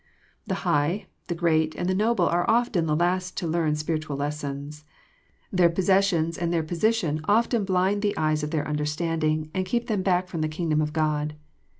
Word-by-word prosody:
The -, -, -1 dB
high, 150 Hz, +8 st, +1 dB, 0.2 s
the 175 Hz, -, -2 dB
great, 160 Hz, -2 st, +1 dB
and 175 Hz, -, -2 dB
the 185 Hz, -, +2 dB
noble 220 Hz, +5 st, +2 dB
are 175 Hz, +1 st, +1 dB
often 225 Hz, -8 st, +2 dB
the 150 Hz, -, +1 dB
last 180 Hz, +2 st, 0 dB
to -, -, -2 dB
learn 160 Hz, -2 st, +1 dB
spirit* 155 Hz, 0 st, -2 dB
ual 140 Hz, -, -3 dB
lessons. 145 Hz, 0 st, -4 dB, 0.7 s
Their 180 Hz, -3 st, +4 dB
possessions 180 Hz, -2 st, +2 dB
and 170 Hz, -1 st, -1 dB
their 165 Hz, -2 st, +1 dB
position 170 Hz, -2 st, 0 dB
often 225 Hz, +1 st, +2 dB
blind 190 Hz, +2 st, +1 dB
the 205 Hz, -1 st, 0 dB
eyes 155 Hz, -1 st, +1 dB
of 150 Hz, -, -3 dB
their 150 Hz, -2 st, -1 dB
understanding, 155 Hz, +1 st, -1 dB
and 185 Hz, -, 0 dB
keep 235 Hz, +6 st, -1 dB
them 210 Hz, -4 st, -1 dB
back 185 Hz, -1 st, +1 dB
from 165 Hz, -3 st, -4 dB
the 155 Hz, -, 0 dB
kingdom 155 Hz, -1 st, 0 dB
of 150 Hz, 0 st, -1 dB
God. 150 Hz, -1 st, -1 dB
165 Hz, 190 wpm, -25 LUFS, 155-185 Hz, 0.7 s, Their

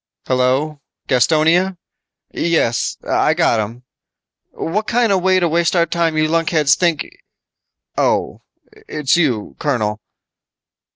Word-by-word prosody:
"Hello, 130 Hz, +4 st, 0 dB, 0.3 s
Gastonia? 160 Hz, +8 st, +2 dB, 0.6 s
Yes, 160 Hz, -9 st, 0 dB
I -, -, +2 dB
got 115 Hz, -, +2 dB
'em. 115 Hz, +4 st, -5 dB, 0.7 s
What 210 Hz, +6 st, -3 dB
kinda 235 Hz, -4 st, +2 dB
way 185 Hz, 0 st, +2 dB
to 175 Hz, -, +1 dB
waste 170 Hz, +2 st, +1 dB
our 170 Hz, -1 st, +3 dB
time 165 Hz, -1 st, -1 dB
you 155 Hz, 0 st, +2 dB
lunkheads 160 Hz, -3 st, +2 dB
think... 170 Hz, -4 st, 0 dB, 0.9 s
oh, -, -, 0 dB, 0.5 s
it's 150 Hz, -3 st, 0 dB
you, 130 Hz, -11 st, 0 dB
colonel!" 110 Hz, -7 st, -1 dB
155 Hz, 110 wpm, -18 LUFS, 130-170 Hz, 0.9 s, our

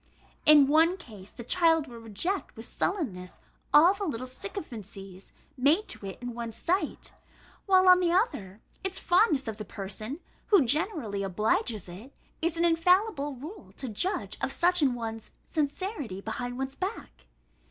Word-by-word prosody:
In 300 Hz, -2 st, +9 dB
one 325 Hz, +6 st, +4 dB
case 210 Hz, -, -12 dB
the 235 Hz, -, -9 dB
child 325 Hz, +2 st, +3 dB
will 240 Hz, -4 st, -10 dB
reject 230 Hz, -, -3 dB
with -, -, -9 dB
sullenness 195 Hz, -, -3 dB, 0.3 s
all 335 Hz, +6 st, +7 dB
the 400 Hz, 0 st, -4 dB
little 255 Hz, -7 st, -3 dB
sycophancies 215 Hz, -, -8 dB, 0.2 s
made 295 Hz, +10 st, +3 dB
to -, -, -7 dB
it 190 Hz, -, -7 dB
in 245 Hz, -1 st, -4 dB
one's 230 Hz, -1 st, -5 dB
sight; 370 Hz, +3 st, -2 dB, 0.5 s
while 375 Hz, -1 st, +5 dB
on 365 Hz, 0 st, +8 dB
the 350 Hz, -2 st, +2 dB
other, 240 Hz, -, 0 dB, 0.2 s
its 380 Hz, 0 st, -2 dB
fondness 350 Hz, -, +3 dB
of 220 Hz, -2 st, -4 dB
the 215 Hz, -, -5 dB
person, 215 Hz, -, -7 dB, 0.3 s
who 390 Hz, -10 st, +5 dB
generally 270 Hz, -, 0 dB
obliges 215 Hz, -, 0 dB
it, 200 Hz, +10 st, -11 dB, 0.3 s
is 335 Hz, 0 st, 0 dB
an 340 Hz, -, +3 dB
infallible 335 Hz, -3 st, +2 dB
rule 275 Hz, -, -10 dB
to 265 Hz, -, -5 dB
judge 365 Hz, -, -2 dB
of -, -, -1 dB
such 360 Hz, 0 st, +2 dB
an 265 Hz, -4 st, +3 dB
one's 225 Hz, -2 st, -6 dB
sincerity 290 Hz, -, -3 dB
behind 245 Hz, +4 st, -5 dB
one's 270 Hz, 0 st, -3 dB
back. 65 Hz, -, -6 dB
280 Hz, 155 wpm, -28 LUFS, 220-355 Hz, 0.5 s, In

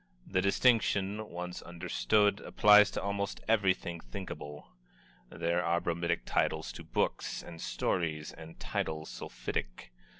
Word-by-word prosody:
The 95 Hz, -1 st, +1 dB
distinction, 105 Hz, -1 st, +2 dB
once 90 Hz, +1 st, -5 dB
understood, 90 Hz, -, +1 dB
applies 105 Hz, -1 st, +6 dB
to -, -, -3 dB
almost 100 Hz, 0 st, -2 dB
everything 95 Hz, -6 st, +1 dB
thinkable. 75 Hz, +2 st, -8 dB, 0.6 s
There 85 Hz, +1 st, 0 dB
are 85 Hz, 0 st, +2 dB
bromidic 85 Hz, -2 st, -1 dB
titles -, -, 0 dB
to -, -, -9 dB
books -, -, -1 dB
and 85 Hz, -1 st, -10 dB
stories, 80 Hz, -4 st, -1 dB
and 80 Hz, +1 st, -12 dB
titles 80 Hz, 0 st, -3 dB
sulphitic. -, -, -5 dB
85 Hz, 120 wpm, -32 LUFS, 80-100 Hz, 0.6 s, applies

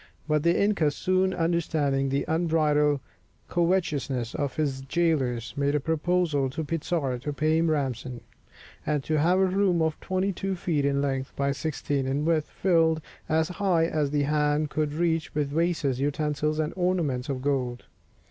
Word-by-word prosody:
But 150 Hz, -1 st, +2 dB
the 170 Hz, +2 st, +2 dB
inca, 200 Hz, -7 st, +2 dB
soon 185 Hz, +5 st, +1 dB
understanding 160 Hz, -6 st, 0 dB
the 140 Hz, +1 st, 0 dB
unbridled 155 Hz, -3 st, +2 dB, 0.5 s
covetousness 155 Hz, -9 st, 0 dB
of 140 Hz, -3 st, -2 dB
his 140 Hz, -4 st, -1 dB
jailors, 135 Hz, -6 st, 0 dB
made 140 Hz, 0 st, +1 dB
a -, -, +3 dB
proposal 160 Hz, -2 st, 0 dB
to 160 Hz, +5 st, -4 dB
Pizarro 150 Hz, -4 st, -2 dB
to 145 Hz, +4 st, -4 dB
pay 155 Hz, +2 st, +1 dB
him 165 Hz, 0 st, +2 dB
ransom, 130 Hz, -5 st, -2 dB, 0.6 s
and 150 Hz, -2 st, -1 dB
to 155 Hz, +1 st, 0 dB
have 175 Hz, +5 st, +3 dB
a 190 Hz, -, +4 dB
room 190 Hz, -2 st, +2 dB
of 160 Hz, -1 st, 0 dB
twenty 190 Hz, +1 st, -1 dB
two 195 Hz, +2 st, -3 dB
feet 160 Hz, -5 st, -1 dB
in 140 Hz, 0 st, +1 dB
length 135 Hz, -1 st, -2 dB
by 140 Hz, 0 st, 0 dB
sixteen 140 Hz, -2 st, -2 dB
in 140 Hz, +3 st, -1 dB
width 160 Hz, -2 st, +1 dB
filled 165 Hz, -3 st, +2 dB, 0.3 s
as 160 Hz, 0 st, +2 dB
high 180 Hz, -3 st, +1 dB
as 155 Hz, -3 st, 0 dB
the 145 Hz, 0 st, +1 dB
hand 150 Hz, 0 st, +1 dB
could 150 Hz, -1 st, -1 dB
reach 165 Hz, -2 st, 0 dB
with 150 Hz, -2 st, 0 dB
vases, 160 Hz, -4 st, 0 dB
utensils, 150 Hz, +1 st, -1 dB
and 155 Hz, 0 st, -1 dB
ornaments 165 Hz, -8 st, 0 dB
of 130 Hz, -2 st, -3 dB
gold. 130 Hz, -4 st, -1 dB
150 Hz, 165 wpm, -26 LUFS, 140-170 Hz, 0.6 s, a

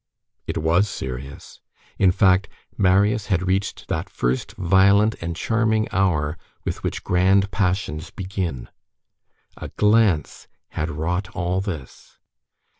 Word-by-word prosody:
It -, -, -3 dB
was 85 Hz, +6 st, +2 dB
serious; 65 Hz, -1 st, -7 dB, 0.4 s
in 95 Hz, -2 st, +5 dB
fact, 95 Hz, +1 st, +3 dB, 0.3 s
Marius 100 Hz, +2 st, +2 dB
had 95 Hz, -3 st, 0 dB
reached 95 Hz, +1 st, -1 dB
that -, -, -2 dB
first 60 Hz, +1 st, -2 dB
violent 100 Hz, +4 st, +4 dB
and 85 Hz, 0 st, -4 dB
charming 110 Hz, +1 st, +1 dB
hour 85 Hz, -5 st, 0 dB, 0.3 s
with -, -, -3 dB
which -, -, -4 dB
grand 95 Hz, +2 st, +3 dB
passions 90 Hz, -4 st, -1 dB
begin. 95 Hz, -, -4 dB, 0.9 s
A -, -, -6 dB
glance 105 Hz, -7 st, +1 dB, 0.2 s
had 75 Hz, +1 st, -3 dB
wrought 85 Hz, +5 st, -2 dB
all 90 Hz, 0 st, -1 dB
this. 80 Hz, -10 st, -8 dB
95 Hz, 115 wpm, -22 LUFS, 80-100 Hz, 0.9 s, in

